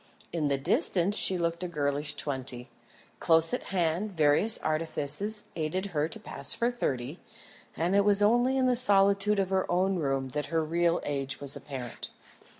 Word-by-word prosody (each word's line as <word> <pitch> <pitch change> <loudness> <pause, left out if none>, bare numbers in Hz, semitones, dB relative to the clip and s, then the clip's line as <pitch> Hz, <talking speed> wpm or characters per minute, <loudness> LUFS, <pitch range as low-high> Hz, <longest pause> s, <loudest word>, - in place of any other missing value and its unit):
In 160 -3 -1
the 140 -1 0
distance 175 +7 +2
she 190 -3 +2
looked 170 0 -2
a - - -3
girlish 145 -2 -2
twenty; 130 -3 -3 0.5
close 165 +4 +3
at 250 - -3
hand 180 +2 -2
various 155 +9 +4
artifices 165 +6 +1
aided 165 +4 -3
her 150 0 0
to 220 +6 -7
pass 225 +2 0
for 235 +1 0
thirty; 135 - -4 0.6
and 175 +4 0
it 200 - +4
was 205 0 +3
only 240 +5 +2
in 260 - +1
the 250 -1 +2
solitude 200 -2 +3
of 195 -1 -1
her 190 -2 -1
own 185 +2 0
room 135 -4 -2
that 150 +3 -4
her 165 -1 -1
real 170 +2 0
age 140 -2 -3
was 140 -1 -1
apparent. 130 -5 -8
170 Hz, 170 wpm, -28 LUFS, 145-200 Hz, 0.6 s, various